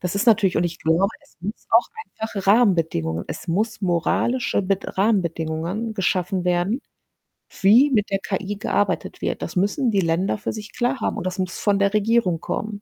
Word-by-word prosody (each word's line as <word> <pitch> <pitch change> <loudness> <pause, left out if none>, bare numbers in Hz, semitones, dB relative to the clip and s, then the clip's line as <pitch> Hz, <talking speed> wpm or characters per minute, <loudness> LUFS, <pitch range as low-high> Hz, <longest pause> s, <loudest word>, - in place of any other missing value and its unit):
das 180 +1 -3
ist 200 +5 0
natürlich 205 -5 +4
und 175 - +1
ich 170 -1 -3
glaube, 165 +5 +2
es - - -26
muss 200 +5 -6
auch 230 +1 +4 0.2
einfache 215 - -6
Rahmenbedingungen 165 - +2
es - - -7
muss 210 +6 -1
moralische 190 +9 +1
Bed 195 0 -2
Rahmenbedingungen 180 +1 0
geschaffen 185 -1 0
werden, 180 +7 +1 0.8
wie 235 +9 +6
mit 210 -5 +1
der 195 -1 0
KI 195 +2 -3
gearbeitet 205 0 -1
wird. - - -2
Das - - -6
müssen 205 +7 +1
die 200 -2 +2
Länder 170 +4 0
für - - -3
sich 215 0 -9
klar 255 +2 0
haben - - -1
und 195 - -5
das 185 -1 -3
muss 185 -2 -3
von 205 -1 +2
der 200 0 +2
Regierung 215 -5 +2
kommen. 210 -1 -4
195 Hz, 185 wpm, -22 LUFS, 175-220 Hz, 0.8 s, wie